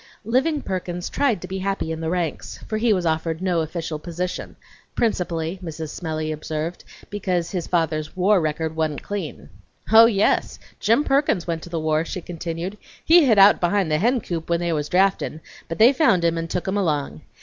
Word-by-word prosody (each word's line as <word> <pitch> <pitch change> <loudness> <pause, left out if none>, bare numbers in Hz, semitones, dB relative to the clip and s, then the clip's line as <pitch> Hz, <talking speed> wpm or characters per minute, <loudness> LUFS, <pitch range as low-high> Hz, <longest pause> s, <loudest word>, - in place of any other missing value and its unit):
Living 265 +6 +1
Perkins 180 -2 -4
tried 245 -11 +1
to - - -6
be 190 0 -4
happy 195 -4 -2
in 160 0 -4
the 160 - -2
ranks, 175 -3 -3
for 215 -1 -2
he 230 0 +2
was 185 -4 +1
offered 160 0 -1
no 180 -3 +1
official 160 -1 -4
position, 175 +3 -5 0.4
principally, 175 -5 -1
Mrs. 160 -2 -6
Smellie 155 -1 -4
observed, 155 +2 -4 0.3
because 185 -4 -1
"his 180 -3 -3
father's 160 -2 -1
war 190 +1 +4
record 160 +1 -2
wa'nt 155 -3 -2
clean." 195 - -5 0.5
"Oh, 225 +1 +9
yes! 205 -3 +1 0.2
Jim 230 +7 +3
Perkins 275 - +1
went 165 -2 -3
to 175 - -10
the 165 -1 -2
war," 155 0 +1
she 175 - -5
continued. 175 +3 -5 0.3
"He 335 -1 +7
hid 225 -5 +4
out 200 +1 +7
behind 175 -1 +1
the 155 - +2
hencoop 205 -8 -1
when 170 0 +2
they 170 -1 0
was 150 -1 -2
draftin', 190 -4 +1 0.3
but 165 - -4
they 235 +5 +7
found 235 - +3
him 165 0 +2
and 165 0 -3
took 180 +2 -3
him 190 +2 0
along. 145 - -1
175 Hz, 190 wpm, -23 LUFS, 160-200 Hz, 0.5 s, Oh